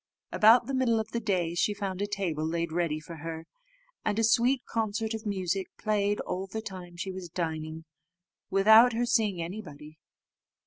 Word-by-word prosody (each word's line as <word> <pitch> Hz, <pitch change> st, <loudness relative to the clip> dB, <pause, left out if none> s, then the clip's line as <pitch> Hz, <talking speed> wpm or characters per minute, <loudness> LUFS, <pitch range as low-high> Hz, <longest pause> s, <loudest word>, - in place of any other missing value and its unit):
About 225 Hz, +3 st, +6 dB
the 275 Hz, -, -4 dB
middle 250 Hz, -4 st, +2 dB
of 220 Hz, 0 st, -4 dB
the 235 Hz, -, -1 dB
day 185 Hz, -7 st, 0 dB
she 205 Hz, +4 st, +1 dB
found 195 Hz, -2 st, -4 dB
a 205 Hz, -, 0 dB
table 190 Hz, -7 st, -2 dB
laid 170 Hz, +1 st, -2 dB
ready 165 Hz, -2 st, -1 dB
for 165 Hz, +2 st, -10 dB
her, 160 Hz, +1 st, -6 dB, 0.6 s
and 210 Hz, -1 st, -1 dB
a 225 Hz, -, +2 dB
sweet 240 Hz, +3 st, +3 dB
concert 220 Hz, 0 st, -2 dB
of 220 Hz, 0 st, -5 dB
music 190 Hz, -1 st, -1 dB
played 205 Hz, -1 st, 0 dB
all 190 Hz, +2 st, -4 dB
the 220 Hz, +3 st, -5 dB
time 185 Hz, -5 st, -9 dB
she 190 Hz, +2 st, -4 dB
was 185 Hz, -2 st, -7 dB
dining, 160 Hz, -1 st, -4 dB, 0.6 s
without 220 Hz, +5 st, +6 dB
her 240 Hz, +2 st, 0 dB
seeing 220 Hz, -6 st, +1 dB
anybody. 155 Hz, -5 st, -9 dB
195 Hz, 175 wpm, -28 LUFS, 170-220 Hz, 0.6 s, About